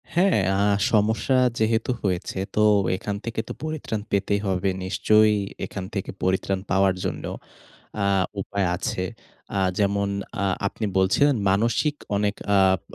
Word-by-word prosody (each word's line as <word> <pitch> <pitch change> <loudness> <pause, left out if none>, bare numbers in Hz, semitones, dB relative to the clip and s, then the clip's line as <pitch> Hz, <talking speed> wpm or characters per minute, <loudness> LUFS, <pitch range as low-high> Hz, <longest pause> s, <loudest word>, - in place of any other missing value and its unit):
হ্যাঁ। 185 - +4 0.2
আ - - 0 0.3
সমস্যা 110 +4 +2 0.2
যেহেতু 110 +2 +1
হয়েছে, 95 -1 -2 0.2
তো 105 - +3 0.3
এখান 100 +1 -4
থেকে 115 -1 -3
তো - - -5
পরিত্রাণ 155 -9 -3
পেতেই 100 +1 +1
হবে। 95 0 0 0.2
নিশ্চয়ই 105 +2 +3 0.3
এখান 95 - -6
থেকে 95 - -3
পরিত্রাণ 95 +1 0
পাওয়ার 95 -1 +3
জন্য - - -3 0.8
আ - - +2 0.3
উপায় 100 0 -1
আছে। 90 0 -2 0.5
আ - - +2 0.2
যেমন 100 0 +1 0.3
আ - - +1 0.2
আপনি 105 +2 -3
বলছিলেন, 130 +9 +3
"মানসিক 115 +9 +1 0.2
অনেক 100 0 +1 0.2
আপ 95 -1 +4
100 Hz, 135 wpm, -24 LUFS, 95-110 Hz, 0.8 s, হ্যাঁ